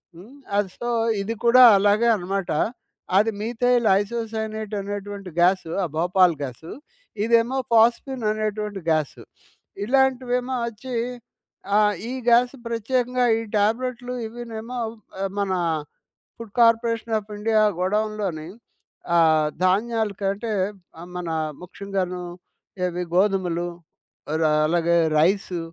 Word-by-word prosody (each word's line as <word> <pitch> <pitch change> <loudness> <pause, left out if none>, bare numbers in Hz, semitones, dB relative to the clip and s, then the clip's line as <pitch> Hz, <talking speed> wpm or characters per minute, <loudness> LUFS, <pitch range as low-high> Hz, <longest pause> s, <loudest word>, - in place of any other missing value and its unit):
హ్మ్. 205 0 -4
సో, 240 - -4 0.3
ఇది 220 +3 -3
కూడా 250 +2 +7 0.2
అలాగే 205 +4 +3
అనమాట. 195 0 -3 0.7
అది 220 +2 +3
మీథైల్ 240 +2 +1
ఐసోసైనైట్ 220 -1 -4
అనేటువంటి 200 -1 -6
గ్యాసు 180 -1 +3
ఆ - - +1
భోపాల్ 180 +1 +3
గ్యాసు. 140 +4 -7 0.5
ఇదేమో 235 +3 +2
ఫాస్‌ఫిన్ 235 +2 +3
అనేటువంటి 210 -1 -3
గ్యాసు. 155 -3 -1 0.6
ఇలాంటివేమో 255 0 +1
అచ్చి 235 +3 -7 0.8
ఆహ్, 210 0 +4 0.2
ఈ - - -4 0.2
గ్యాస్ 245 +2 +4
ప్రత్యేకంగా 250 +2 0
ఈ - - -3 0.2
టాబ్లెట్లు, 245 +4 -1
ఇవీనేమో 230 +1 -7 0.6
మన 200 -1 0 0.9
ఫుడ్ 230 -3 -10
కార్పొరేషన్ 230 -1 +3
ఆఫ్ 210 +1 -14
ఇండియా 215 0 +2 0.2
గోడౌన్‌లోని 200 -4 -1 0.7
ఆహ్, 155 -2 +4 0.2
ధాన్యాల 220 +3 +1
కంటే 200 +3 -2 0.6
మన 180 - -5 0.4
ముఖ్యంగాను, 185 -1 -4 0.6
ఇవి 180 0 -2
గోధుమలు, 180 -3 +1 0.6
అ - - -1 0.3
అలాగే 170 +1 +2 0.2
రైసు, 185 +1 +1
215 Hz, 100 wpm, -23 LUFS, 190-235 Hz, 0.9 s, కూడా